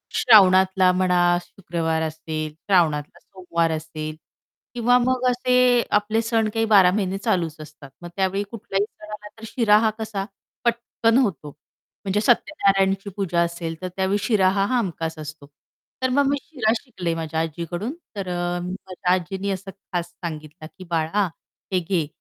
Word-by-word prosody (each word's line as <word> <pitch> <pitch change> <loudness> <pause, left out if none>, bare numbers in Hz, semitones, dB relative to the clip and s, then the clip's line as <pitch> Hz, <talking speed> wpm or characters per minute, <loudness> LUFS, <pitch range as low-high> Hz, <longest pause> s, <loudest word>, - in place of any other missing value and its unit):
श्रावणातला 190 -4 +6
म्हणा, 180 -1 +3
शुक्रवार 165 -3 -3
असेल, 155 -1 -4
श्रावणातला 160 -4 +1
सोमवार 170 -3 -2
असेल 155 -1 -5 0.6
किंवा 245 0 +3
मग 255 0 0
असे 250 0 +1 0.4
आपले 215 +2 -1
सण 225 -1 +1
काही 225 0 +1
बारा 195 -5 +6
महिने 195 -1 -1
चालूच 180 -7 -1
असतात. 150 -2 -12
मग 175 - -8
त्यावेळी 195 +1 0
कुठल्याही 200 -3 -2
सणाला 210 0 -10
तर 220 - -15
शिरा 215 -3 +4
हा 220 0 +3
कसा 215 -3 -3 0.4
पटकन 235 0 +1
होतो. 195 - 0 0.6
म्हणजे 200 +1 +1
सत्यनारायणाची 195 -5 +2
पूजा 180 -4 0
असेल 170 -1 -4
तर 185 - -3
त्यावेळी 190 +1 +1
शिरा 200 -5 +3
हा 195 - +3
हमखास 165 -7 -3
असतो. 150 -1 -8 0.6
तर 260 - +2
मग 280 +2 +3
मी 285 +1 +2
शिरा 245 -9 -1
शिकले 180 -10 -4
माझ्या 160 -1 -3
आजीकडून. 170 - -3 0.2
तर 195 -2 -4
अ, 175 0 -2
माझ्या 180 0 -2
आजीनी 190 +2 -2
असं 195 0 -5
खास 175 -3 -5
सांगितलं 155 -1 -8
की, 185 - -9
"बाळा, 170 +4 +1 0.5
हे 185 - +3
घे 170 -3 -1
190 Hz, 150 wpm, -23 LUFS, 170-210 Hz, 0.6 s, श्रावणातला